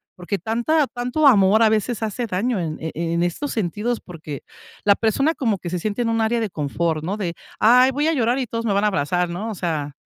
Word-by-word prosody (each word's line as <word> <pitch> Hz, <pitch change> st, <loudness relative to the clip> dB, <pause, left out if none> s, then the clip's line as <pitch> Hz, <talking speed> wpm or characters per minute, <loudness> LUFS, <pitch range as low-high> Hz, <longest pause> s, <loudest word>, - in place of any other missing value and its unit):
porque 180 Hz, +3 st, -3 dB
tanta 240 Hz, -, +1 dB
tanto 245 Hz, +6 st, +1 dB
amor 210 Hz, -3 st, +5 dB
a 225 Hz, -, +6 dB
veces 220 Hz, +1 st, 0 dB
hace 220 Hz, +3 st, -2 dB
daño 220 Hz, +3 st, -1 dB
en 160 Hz, -3 st, -3 dB
e 160 Hz, 0 st, -4 dB
en 170 Hz, +1 st, -1 dB
estos 175 Hz, +12 st, -2 dB
sentidos, 220 Hz, +4 st, -2 dB
porque 155 Hz, -5 st, -9 dB, 0.4 s
la 200 Hz, -1 st, +6 dB
persona 275 Hz, +8 st, +1 dB
como 225 Hz, -8 st, 0 dB
que 175 Hz, -, -6 dB
se 180 Hz, -, -2 dB
siente 210 Hz, +5 st, -2 dB
en 230 Hz, -, -1 dB
un 225 Hz, 0 st, +1 dB
área 230 Hz, +2 st, +1 dB
de 220 Hz, -3 st, -1 dB
confort, 155 Hz, 0 st, -2 dB
¿no?, 195 Hz, +6 st, -2 dB
de: 175 Hz, -5 st, -3 dB, 0.3 s
"Ay, 250 Hz, +4 st, +6 dB
voy 290 Hz, +4 st, 0 dB
a 325 Hz, -, +2 dB
llorar 245 Hz, -2 st, +1 dB
y 255 Hz, -, -2 dB
todos 230 Hz, +1 st, -3 dB
me 215 Hz, -, +1 dB
van 200 Hz, +1 st, +2 dB
a -, -, +4 dB
abrazar, 180 Hz, -1 st, 0 dB
¿no? 195 Hz, +6 st, -4 dB
O 210 Hz, -, -6 dB
sea, 155 Hz, -5 st, -2 dB
210 Hz, 240 wpm, -22 LUFS, 175-240 Hz, 0.4 s, a